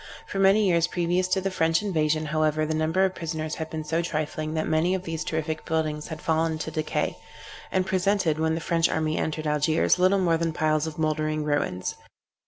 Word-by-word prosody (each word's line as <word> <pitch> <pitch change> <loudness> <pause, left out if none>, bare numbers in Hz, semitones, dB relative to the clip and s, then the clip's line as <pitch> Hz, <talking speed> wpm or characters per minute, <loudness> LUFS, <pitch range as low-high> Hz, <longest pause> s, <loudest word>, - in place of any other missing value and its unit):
For 195 - -4
many 195 +2 +5
years 170 -2 +3
previous 175 +1 0
to 185 +1 +1
the 195 +1 -1
French 165 +1 +1
invasion, 155 -5 +1
however, 155 0 +1
the 160 - -1
number 160 +4 +2
of 190 - -1
prisoners 155 -2 -4
had 160 0 -4
been 155 -1 -4
so 165 +2 0
trifling, 155 -1 -3
that 155 - 0
many 160 +4 +2
of 185 - -4
these 165 -3 -3
terrific 160 0 -3
buildings 155 -2 -2
had 160 -2 -7
fallen 160 0 +1
to 160 - -5
decay, 155 0 -2 0.5
and 185 -1 +1
presented, 185 -4 +1
when 160 0 +1
the 165 - -3
French 165 0 +2
army 155 -1 0
entered 155 0 -2
Algiers, 150 +4 +2
little 185 +2 +4
more 170 -3 +2
than 165 -1 -1
piles 155 -1 +1
of 155 - -6
mouldering 155 -1 0
ruins. 145 -11 -1
160 Hz, 200 wpm, -26 LUFS, 155-175 Hz, 0.5 s, many